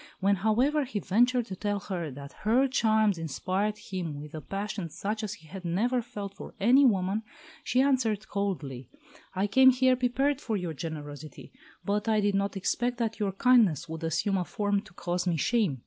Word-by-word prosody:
When, 200 +1 +2
however, 245 +10 +2
he 255 -5 -5
ventured 240 +6 +2
to 190 - -6
tell 205 +1 -2
her 175 -6 -4
that 140 +1 -10
"her 240 +6 +3
charms 220 -6 +2
inspired 190 +7 -2
him 185 -8 -5
with 150 +1 -10
a 155 - -6
passion 195 +2 -4
such 210 +7 -3
as 210 -1 -3
he 160 -5 -18
had 190 +3 -9
never 225 +9 +1
felt 210 -4 -7
for - - -10
any 245 +8 +5
woman," 195 -1 +1 0.4
she 255 - +2
answered 225 -6 +1
coldly, 160 - -3 0.5
"I 190 +2 +1
came 260 +5 +6
here 260 0 +4
prepared 270 +3 0
for 220 -6 -1
your 175 -4 -3
generosity, 150 - -8 0.3
but 210 +2 -1
I 215 -1 +3
did 205 -1 +1
not 200 0 0
expect 245 +5 -1
that 225 -2 -2
your 200 -2 0
kindness 200 - +4
would 160 0 -6
assume 170 +5 0
a 180 - 0
form 205 +2 -1
to 190 - -16
cause 175 0 -2
me 170 -2 +1
shame. 205 - +1
205 Hz, 190 wpm, -28 LUFS, 175-235 Hz, 0.5 s, came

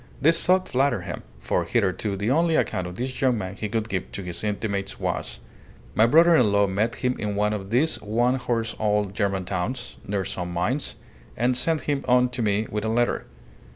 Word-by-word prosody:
This 165 +5 +3
thought 185 +1 +3
flattered 135 +3 +1
him, - - -6 0.2
for - - 0
hitherto 100 -2 0
the 105 +5 0
only 165 +3 +3
account 90 -10 0
of 90 - -8
this 130 +4 -4
young 130 -3 +3
man 95 -2 -4
he 105 +1 -4
could 110 +1 -1
give 95 -5 -3
to 100 - -5
his 90 0 -7
intimates 100 -2 -2
was - - -3 0.5
"My 110 - +5
brother 165 +6 +6
in 120 -9 +4
law 100 0 +4
met 105 +5 0
him 125 0 0
in 105 -1 -2
one 105 +1 +1
of 100 -2 -5
these 135 +8 +1
one 120 +4 +1
horse 115 -2 -2
old 105 -2 +1
German 100 -3 -1
towns, 105 +8 -3
near 100 -1 -1
some 90 -1 -4
mines, 90 +12 -1 0.4
and 125 +2 +2
sent 160 +5 +1
him 145 -2 -1
on 125 0 +4
to 125 0 -4
me 105 0 +1
with 105 0 -2
a 110 - -1
letter. 120 +2 0
110 Hz, 205 wpm, -25 LUFS, 100-125 Hz, 0.5 s, brother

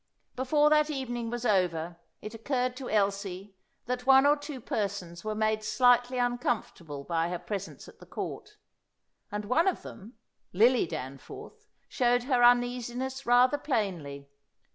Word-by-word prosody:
Before 295 +4 +2
that 300 0 +4
evening 245 -5 -3
was 240 +1 -4
over 175 -5 0 0.3
it 215 - -7
occurred 250 +2 -2
to 260 -2 -6
Elsie 200 -1 -1 0.3
that 250 +1 -4
one 270 0 +7
or 290 +1 +5
two 290 -2 -8
persons 200 -6 -4
were 215 0 -3
made 215 0 0
slightly 245 +3 +3
uncomfortable 240 - -2
by 165 +2 -1
her 180 - -3
presence 185 -7 -6
at - - -16
the - - -15
Court; - - -7 0.7
and 210 0 -4
one 315 - +2
of 380 - 0
them, 225 +3 -11 0.4
Lily 230 +2 +4
Danforth, 140 -4 -9 0.2
showed 245 -1 +1
her 250 -1 +1
uneasiness 245 +2 +1
rather 250 +4 +4
plainly. 170 - -3
235 Hz, 140 wpm, -29 LUFS, 195-255 Hz, 0.7 s, one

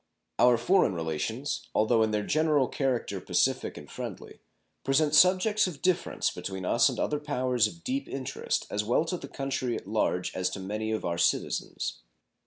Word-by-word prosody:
Our 125 -1 +6
foreign 180 - +3
relations, 85 - -3
although 110 +1 +3
in 110 - +3
their 105 -1 -1
general 155 -4 +2
character 120 -9 -2
pacific - - 0
and - - -10
friendly, - - -8 0.4
present 145 +2 +2
subjects 185 +6 +5
of 160 -6 -8
difference 185 -2 +1
between 95 -1 -6
us 120 +8 +4
and 125 - -5
other 150 - 0
powers 130 -6 +1
of 170 +8 -12
deep 270 +5 -2
interest 135 -2 -3
as 105 - 0
well 120 +9 +1
to 180 +2 -2
the - - -9
country 135 -3 -2
at - - -9
large 95 -3 -1
as 95 0 0
to 95 - -6
many 105 +3 -3
of 110 - -2
our 85 0 -2
citizens. 60 - -1
125 Hz, 175 wpm, -28 LUFS, 105-155 Hz, 0.4 s, Our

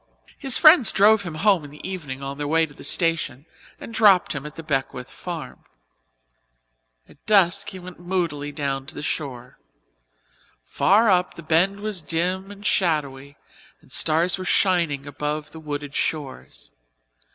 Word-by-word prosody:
His 270 -3 +3
friends 310 -5 +7
drove 215 +1 +5
him 170 -5 -7
home 190 0 +2
in 145 - -10
the 150 +5 -10
evening 145 -8 -6
on 140 +1 -6
their 145 - -3
way 165 +2 +2
to 150 - -16
the - - -14
station 165 -6 0 0.3
and 230 - -10
dropped 205 -5 +4
him 145 0 -6
at 150 - -12
the 165 - -8
Beckwith 135 -3 -3
farm. 170 -3 -8 1.4
At - - -21
dusk 200 -1 +3
he 190 - -9
went 180 -1 -11
moodily 170 -5 -3
down 140 -2 -3
to 160 - -5
the - - -7
shore. 125 -5 -5 1.1
Far 210 - +3
up 180 -1 +1
the 170 - -10
Bend 180 +6 +1
was 210 -4 -4
dim 180 +5 -2
and 205 0 -12
shadowy 145 -7 -1 0.4
and - - -23
stars 170 +5 +1
were - - -4
shining 170 -8 +1
above 150 +1 -4
the 160 - -11
wooded 145 -2 -6
shores. 135 - -4
165 Hz, 160 wpm, -23 LUFS, 145-190 Hz, 1.4 s, friends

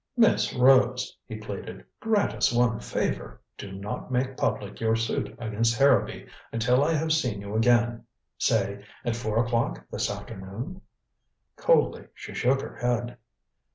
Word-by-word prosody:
"Miss 225 -2 +3
Rose," 125 -1 +4
he 110 - -6
pleaded, 100 -12 -7
"grant 220 -2 +1
us - - +2
one 120 -2 +2
favor. - - -3 0.2
Do 100 - -8
not 100 +6 -6
make 130 +1 0
public 100 -5 -2
your 110 0 +2
suit 115 0 -2
against 115 0 0
Harrowby 140 +1 +3 0.3
until 125 +4 +3
I 160 +3 +2
have 160 0 +1
seen 125 -10 0
you 100 +1 -6
again 120 0 +3 0.3
say, 100 -2 +1 0.2
at 120 -1 0
four 115 0 0
o'clock 115 - -1
this - - -1
afternoon." 115 - -7 0.7
Coldly - - +2
she - - -9
shook 135 +2 +2
her - - -8
head. 120 0 -1
120 Hz, 145 wpm, -27 LUFS, 110-130 Hz, 0.7 s, Rose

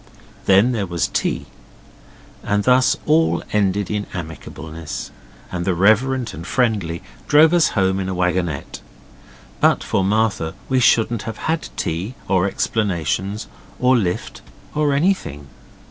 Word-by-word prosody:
Then 100 +6 +5
there 105 -5 -2
was 85 -1 -1
tea, - - -1 1.0
and 105 0 0
thus 130 +2 +4
all 160 +2 +2
ended 100 -1 +1
in 105 -1 -2
amicableness, 80 -1 -7 0.4
and 85 -1 -3
the 90 0 0
reverend 115 +7 +2
and 85 +3 -8
friendly 105 -10 0 0.2
drove 155 +2 +6
us 170 -3 +5
home 95 0 +2
in 95 -1 -2
a 95 - -3
wagonette. 90 -4 -1 0.8
But - - +3
for 95 - 0
Martha 100 -5 0
we 130 -1 +2
shouldn't 120 -2 +3
have 110 - -6
had 160 0 -2
tea, 95 +10 -3
or 95 0 +2
explanations, 100 0 -1 0.3
or 130 0 +4
lift 95 -7 -2 0.3
or 150 -1 +1
anything. 140 - 0
100 Hz, 130 wpm, -20 LUFS, 90-125 Hz, 1.0 s, drove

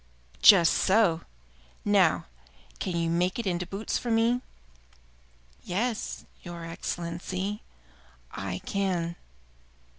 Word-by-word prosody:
"Just 175 -6 +8
so! 190 -5 +3 0.6
Now, - - +3 0.5
can 180 - -2
you 165 0 0
make 175 +2 +1
it 235 - -3
into 180 -2 -1
boots 200 +3 -2
for 240 - -4
me?" 230 +2 +3 1.2
"Yes, 215 - -2 0.2
your 170 -2 -7
Excellency, 175 +4 -4 0.7
I 95 -1 -4
can." 180 -4 -1
180 Hz, 95 wpm, -28 LUFS, 170-210 Hz, 1.2 s, Just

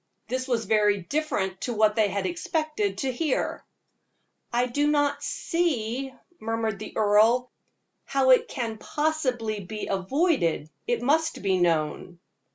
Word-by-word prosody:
This 255 +1 -2
was 235 -3 0
very 210 -2 +3
different 190 - -2
to 245 - -2
what 215 -1 +3
they 215 -2 +3
had 200 0 -2
expected 310 - -1
to 265 -2 -1
hear. 290 +2 -1 0.9
"I 240 +1 +2
do 285 +4 0
not 290 -1 +1
see," 270 -7 -1 0.3
murmured 225 -2 -2
the 215 - -8
earl, 220 +4 +4 0.5
"how 270 -1 +3
it 255 - +5
can 230 -4 -4
possibly 255 -9 -1
be 210 +3 -6
avoided 190 - 0 0.2
it 240 0 0
must 315 +1 +1
be 190 -2 +2
known." 170 +1 0
235 Hz, 135 wpm, -26 LUFS, 205-285 Hz, 0.9 s, it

